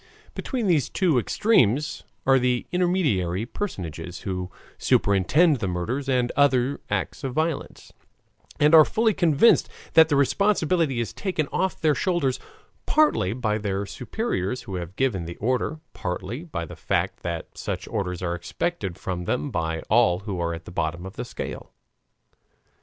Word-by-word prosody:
Between 250 -5 -3
these 160 -9 +2
two 170 -9 +2
extremes 150 - +2 0.2
are 135 0 +5
the 125 -1 0
intermediary 145 - +1
personages 90 - -5
who 90 -1 -4 0.3
superintend 130 - +3
the 100 - -2
murders 115 +11 -2
and 125 -2 +1
other 135 -1 +2
acts - - -2
of 130 -1 -3
violence, 160 -1 -3 0.7
and 150 +2 +4
are 160 -1 +10
fully 220 +6 +1
convinced 170 +5 +4 0.2
that 160 -1 +7
the 145 - +2
responsibility 165 - +2
is 115 - -3
taken 180 -7 -2
off 190 -1 -1
their 155 -2 +3
shoulders 140 -3 0 0.5
partly 300 - +3
by 110 -3 -1
their 100 -1 -2
superiors 120 - -3
who 95 - -8
have 90 +1 -6
given 110 -10 0
the 85 +1 -7
order, 130 +7 -1
partly 95 - -4
by 140 - -4
the - - -10
fact - - -1
that 85 -1 -5
such - - -4
orders 95 -5 -3
are 85 -1 -1
expected 95 - -3
from 90 -2 -4
them 130 +8 -1
by 80 -4 -2
all 110 -6 +3
who 100 -3 -4
are 85 -1 -1
at 85 - -11
the - - -9
bottom 85 +1 -2
of 95 - -9
the - - -4
scale. - - -7
125 Hz, 155 wpm, -25 LUFS, -, 0.7 s, are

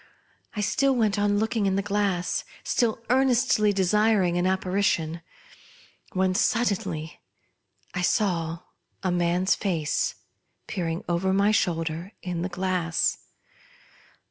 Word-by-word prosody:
I 210 - -1
still 270 +6 +2
went 215 -3 +1
on 205 0 +2
looking 220 -1 0
in 190 - +1
the 195 - 0
glass, 200 -3 0 0.2
still 230 -2 0
earnestly 250 -5 +3
desiring 200 -1 +2
an 175 +1 +1
apparition, 185 -3 0 0.9
when 185 0 +1
suddenly 185 -8 0 0.7
I 180 - -2
saw 170 -4 0 0.4
a 185 - +1
man's 175 +2 +2
face 165 -7 -1 0.5
peering 170 +1 -3
over 180 +2 +1
my 200 +2 +3
shoulder 165 -1 -1
in 175 -2 -3
the 180 - -2
glass. 180 -2 0
190 Hz, 115 wpm, -26 LUFS, 175-210 Hz, 0.9 s, earnestly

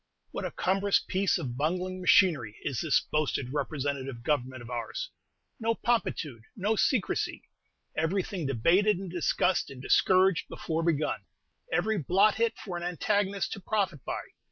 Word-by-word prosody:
What - - -4
a - - -1
cumbrous 195 +2 +2
piece 190 +1 +1
of 130 -8 -4
bungling 180 +5 -1
machinery 155 - +4
is 130 -5 -2
this 155 -4 +3
boasted 140 -4 0
"representative 140 -4 -3
government" 130 -3 -1
of 120 - -10
ours! - - -4 0.5
No 230 0 +1
promptitude, 160 - -1
no 210 +2 +1
secrecy! 225 0 0 0.5
Everything 175 0 -1
debated, 175 - +3
and 190 -2 -6
discussed, 180 +1 +1
and 135 -2 -10
discouraged, 185 +7 +3
before 160 0 -2
begun; 160 -3 0 0.5
every 220 -1 +1
blot 195 +8 +4
hit 230 0 0
for 180 -4 -5
an 175 - -5
antagonist 200 +3 0
to - - -6
profit 190 - -1
by! - - -3
175 Hz, 145 wpm, -29 LUFS, 140-200 Hz, 0.5 s, machinery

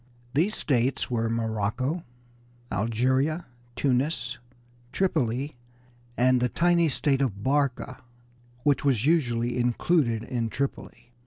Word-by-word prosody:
These 175 +10 +2
states 130 -1 0
were 115 -1 0
Morocco, 115 - -1 0.7
Algeria, 130 - +1 0.3
Tunis, 125 -2 0 0.5
Tripoli, 140 -7 0 0.6
and 125 0 +4
the 125 - +2
tiny 170 +3 +3
state 135 +1 +1
of 100 -7 -1
Barca, 140 -1 0 0.6
which 145 -2 +2
was 130 -5 +2
usually 120 -6 +1
included 120 -1 +1
in 115 -2 -2
Tripoli. 135 -2 -5
130 Hz, 100 wpm, -27 LUFS, 115-145 Hz, 0.7 s, and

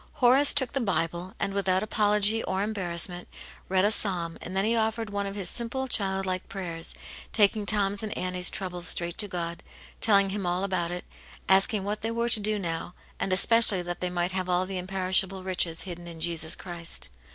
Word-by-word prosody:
Horace 270 +1 +5
took 260 -3 0
the 275 - -1
Bible, 180 -3 -2
and 195 - -2
without 190 -1 0
apology 210 0 +1
or 190 +1 -1
embarrassment, 180 -4 -2 0.4
read 190 +1 +3
a 210 - +2
Psalm, 180 -6 +2
and 185 - -7
then 195 - +1
he 230 +2 +1
offered 220 -1 -1
one 200 0 -2
of 195 - -6
his 195 -3 -2
simple, 245 +6 -2
child 195 -5 -1
like 185 -1 -4
prayers, 170 -4 -2 0.4
taking 210 -1 +3
Tom's 200 -1 +1
and 215 -1 -5
Annie's 180 0 +4
trouble 180 -2 -5
straight 170 0 0
to 210 - +2
God, 170 -2 -5 0.4
telling 200 -3 +4
Him 200 0 -3
all 180 +1 -1
about 185 -3 -1
it, 180 0 -6 0.4
asking 195 +1 +3
what 205 +2 -4
they 225 - -2
were 235 +1 -1
to 230 - +5
do 210 +1 0
now, 170 -2 -4 0.2
and 195 - -2
especially 200 -1 +4
that 175 0 -5
they 180 - -2
might 175 0 -1
have 185 -1 -3
all 180 +1 +1
the 185 -1 -5
imperishable 190 0 +2
riches 180 -3 -1
hidden 175 -2 -8
in 165 -1 -10
Jesus 160 -1 +1
Christ. 175 -2 -3
190 Hz, 195 wpm, -27 LUFS, 180-210 Hz, 0.4 s, Horace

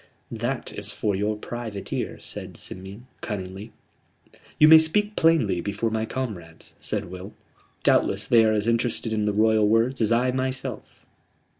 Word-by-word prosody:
"That - - -3
is - - -4
for 105 -2 -1
your 105 +2 -1
private 110 -3 -6
ear," - - -3
said - - -7
Simeon, 95 +6 -5 0.2
cunningly. 100 +1 -6 0.9
"You 155 - +7
may 160 0 +10
speak 210 +7 +1
plainly 140 - +3
before 105 +4 -2
my 110 0 -1
comrades," 90 -12 -6
said - - -2
Will. 95 +3 -8 0.5
"Doubtless - - +2
they 115 -1 +5
are 110 - +3
as 105 0 0
interested 115 -1 0
in 105 -1 0
the 105 - +1
Royal 110 0 +3
words 115 +4 +2
as 110 0 +2
I 125 +2 +3
myself." 130 0 -4
110 Hz, 155 wpm, -25 LUFS, 105-125 Hz, 0.9 s, may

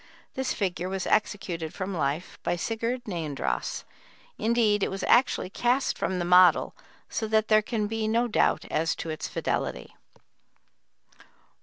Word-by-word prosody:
This 265 0 -2
figure 185 -2 -2
was 190 -1 -3
executed 170 -6 -1
from 190 +1 -4
life 155 0 -2
by - - 0
Sigurd 230 +6 -2
Neandross; 160 -8 -3 0.6
indeed 220 -2 +2
it - - +1
was 195 - -5
actually 240 -6 +3
cast 245 +5 +1
from 190 - -2
the 175 - -1
model, 180 +1 +5 0.3
so 220 - -3
that 220 0 +1
there 215 0 +6
can 215 -1 -2
be 220 +1 -2
no 230 +2 +2
doubt 215 - +1
as 160 +1 +1
to 165 - -5
its 155 - -4
fidelity. - - -3
205 Hz, 145 wpm, -27 LUFS, 175-225 Hz, 0.6 s, there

